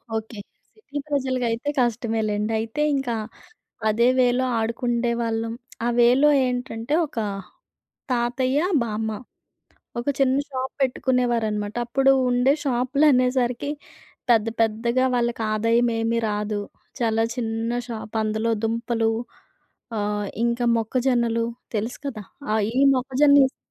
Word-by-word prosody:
Okay. 220 -1 -5 0.4
City 365 -10 -9
ప్రజలకి 260 -3 0
అయితే 230 +5 -2
కష్టమే 230 -2 0
లెండి. 210 +1 -1
అయితే 225 +7 -3
ఇంకా 270 -3 -1 0.8
అదే 235 +3 +3
వేలో 250 +1 +3
ఆడుకుండే 235 +1 0
వాళ్లం. 225 0 -2 0.3
ఆ - - +2
వేలో 255 +5 +5 0.2
ఏంటంటే, 250 +1 -3
ఒక 290 - -15 1.0
తాతయ్య, 255 +3 +1 0.2
బామ్మ 220 -1 -2 0.9
ఒక 240 - -3
చిన్న 265 -1 +3
షాప్ 260 0 -3
పెట్టుకునేవారన్నమాట. 240 -5 0
అప్పుడు 270 +3 +3 0.2
ఉండే 245 +2 +3
షాపులనేసరికి 255 0 +2 0.6
పెద్ద 225 -2 +4
పెద్దగా 235 +3 +1
వాళ్లకి 235 -1 0
ఆదాయం 230 +2 +2
ఏమీ 230 +1 0
రాదు. 210 0 -2 0.4
చాలా 225 -1 +1
చిన్న 225 -1 -2 0.2
షాప్. 225 -1 -7
అందులో 220 +2 0
దుంపలు, 230 0 0 0.9
ఆహ్, 205 0 -1 0.2
ఇంకా 235 +1 +1
మొక్కజొన్నలు. 235 0 +1 0.3
తెలుసు 220 +4 -3
కదా! 230 -6 -5 0.3
ఆహ్, 220 -1 +2
ఈ - - 0 0.2
మొక్కజొన్న, 275 +3 +4
ఎస్ 260 - -15
235 Hz, 115 wpm, -23 LUFS, 225-255 Hz, 1.0 s, వేలో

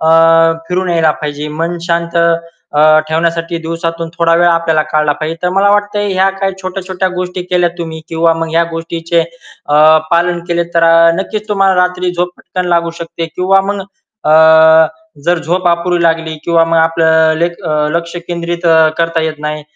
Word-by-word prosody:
अ, 160 - +2 0.6
फिरून 180 0 -1
यायला 165 -2 +2
पाहिजे. 150 0 -4
मन 170 +1 -2
शांत 170 0 -1 0.6
अ, 155 +1 +5
ठेवण्यासाठी 165 +1 -1
दिवसातून 165 0 -4
थोडा 165 0 +3
वेळ 175 +1 +3
आपल्याला 165 -2 +1
काढला 150 -2 +1
पाहिजे. 160 +1 -3
तर 180 - +1
मला 200 +1 +3
वाटतं, 205 0 0
ह्या 190 0 +1
काही 195 0 -1
छोट्या-छोट्या 185 0 -3
गोष्टी 180 0 -5
केल्या 180 -1 0
तुम्ही, 160 -1 -6
किंवा 165 0 +1
मग 165 0 -3
ह्या 165 +1 +2
गोष्टीचे 165 +1 -2
अ, 165 -3 -5 0.3
पालन 175 0 +1
केले, 170 0 0
तर 170 0 +3 0.4
नक्कीच 215 +2 -5
तुम्हाला 195 -2 +2
रात्री 180 0 -1
झोप 175 0 -2
पटकन 180 -1 -5
लागू 170 -1 +1
शकते. 165 0 -5
किंवा 190 +1 +3
मग 200 - -3 0.5
अ, 160 0 +6 0.4
जर 175 +1 +1
झोप 175 +3 -2
अपुरी 170 0 0
लागली 165 -1 0
किंवा 170 -1 +3
मग 165 0 0
आपलं 160 -1 +2
लेक 170 +1 -1 0.4
लक्ष 170 0 -5
केंद्रित 170 0 -3 0.3
करता 165 0 0
येत 160 -1 -2
नाही, 150 0 -4
170 Hz, 165 wpm, -13 LUFS, 165-180 Hz, 0.6 s, अ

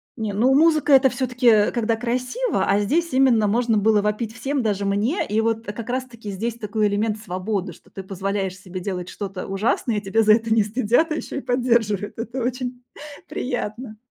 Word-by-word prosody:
Не, 220 -4 -3
ну, 245 +7 +3
музыка- 310 -1 +4
это 265 0 +6
всё-таки 245 -4 +3
когда 230 -1 0
красиво, 250 - -1
а 200 +1 +2
здесь 320 +10 0
именно 255 -5 +4
можно 230 +1 +1
было 210 0 +3
вопить 210 +2 -2
всем, 265 +3 -2
даже 205 -2 -1
мне. 210 - 0
И 215 +2 +1
вот 225 0 -1
как 220 +3 -6
раз-таки 240 -5 -4
здесь 225 +4 -3
такой 215 -1 -1
элемент 210 +1 0
свободы, 190 -1 -3
что - - -21
ты 195 - -7
позволяешь 195 0 -3
себе 185 -1 -8
делать 180 -1 -4
что-то 195 -2 -6
ужасное 210 +3 0
и 205 - -1
тебя 220 +3 +1
за 215 - +6
это 225 0 0
не 220 -1 +4
стыдят, 240 - +1
а 310 - 0
ещё 280 - -5
и - - -3
поддерживают. 235 -6 0
Это 235 +3 -4
очень 250 0 -3 0.5
приятно. 240 -2 -4
225 Hz, 185 wpm, -22 LUFS, 205-250 Hz, 0.5 s, это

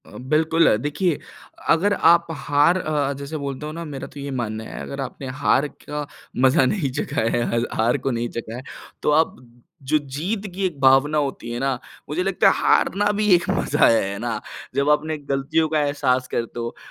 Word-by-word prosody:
अ, - - -12
बिल्कुल, 155 +3 +3
देखिए 150 +3 0 0.5
अगर 195 +5 +4 0.2
आप 170 0 +2 0.2
हार 145 +5 +4
अ, 145 -3 0
जैसे 140 +3 -6
बोलते 140 0 -5
हो 155 - -4
ना, 165 +2 -6
मेरा 140 -3 -6
तो 145 - -12
ये 140 0 -5
मानना 110 -1 -4
है, - - -8
अगर 140 0 -5
आपने 135 +1 -6
हार 140 - +3 0.2
का 150 -1 -3 0.4
मजा 130 0 +5
नहीं 155 -2 0
चखा 140 -3 -1
है, 115 +1 +1
हल 115 0 0
हार 115 +2 +2
को 135 - +2
नहीं 120 0 -2
चखा 115 -1 -5
है, 125 - -6 0.4
तो - - +3
आप 160 - -4 0.6
जो 155 - +6 0.2
जीत 195 +8 -2
की 195 0 -1
एक 170 -7 -3
भावना 135 +3 +5
होती 140 -5 -2
है 120 - -3
ना, 135 +1 +1 0.4
मुझे 165 +5 -1
लगता 195 +1 +3
है, - - +3
हारना 205 +2 +2
भी 210 - +2
एक 175 - -1
मज़ा - - +3
है। 115 - +5
है 100 - -5
ना? 115 -2 -2 0.4
जब 140 +1 +2
आप 150 0 +5
अपने 155 +1 -4
गलतियों 145 +3 0
का 155 0 +1
एहसास 130 -3 0
करते 120 0 -2
हो 120 0 -4
145 Hz, 205 wpm, -22 LUFS, 130-160 Hz, 0.6 s, जो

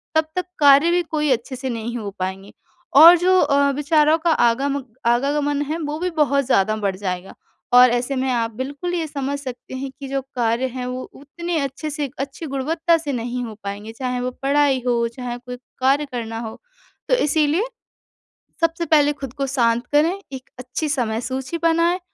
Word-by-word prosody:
तब 315 0 +3
तक 365 - -1
कार्य 285 +3 +6
भी 355 0 +3
कोई 305 -2 -1
अच्छे 255 +2 -1
से 260 +1 -4
नहीं 235 0 -4
हो 205 -3 -5
पाएँगे। 190 +2 -4 0.5
और 340 +2 +10
जो 370 +2 +3
अ, 280 0 +3
विचारों 300 +2 +3
का 335 +1 0
आगामग 265 -1 +1
आवागमन 285 +4 +1
है 320 - -1
वो 300 0 -4
भी 360 +1 -1
बहुत 280 0 +1
ज़्यादा 215 -4 +2
बढ़ 200 -3 -1
जाएगा। 185 -1 -4 0.4
और 250 0 +8
ऐसे 245 +3 -1
में 260 0 -1
आप 230 -2 0
बिल्कुल 285 +8 -4
ये 335 -2 -1
समझ 280 -1 -3
सकते 260 -2 -8
हैं 270 +1 -4
कि 275 - -6
जो 275 0 -1
कार्य 235 +1 +1
है 250 -1 -4
वो 255 0 -4
उतने 330 +4 -4
अच्छे 275 +3 -4
से 290 -2 -3
अच्छी 275 +4 -5
गुणवत्ता 320 +5 +1
से 305 -3 -4
नहीं 245 +1 -3
हो 220 -2 -8
पाएँगे 205 +2 -6
चाहे 250 +1 -3
वो 250 0 -2
पढ़ाई 280 -1 +2
हो, 235 -1 +2
चाहे 240 +1 -6
कोई 250 0 -8 0.2
कार्य 275 +3 +2
करना 225 -2 -4
हो 225 -1 -7 0.5
तो - - +2
इसीलिए 310 - +2 1.0
सबसे 330 +1 +1
पहले 295 -1 +4
खुद 270 -4 -7
को 275 -1 -2
शांत 240 -2 +1
करें 325 +6 +3
एक 260 -1 -9
अच्छी 255 +5 -4
समय 230 -6 -1
सूची 265 +6 -4
बनाएँ 335 +2 +2
270 Hz, 185 wpm, -21 LUFS, 240-300 Hz, 1.0 s, और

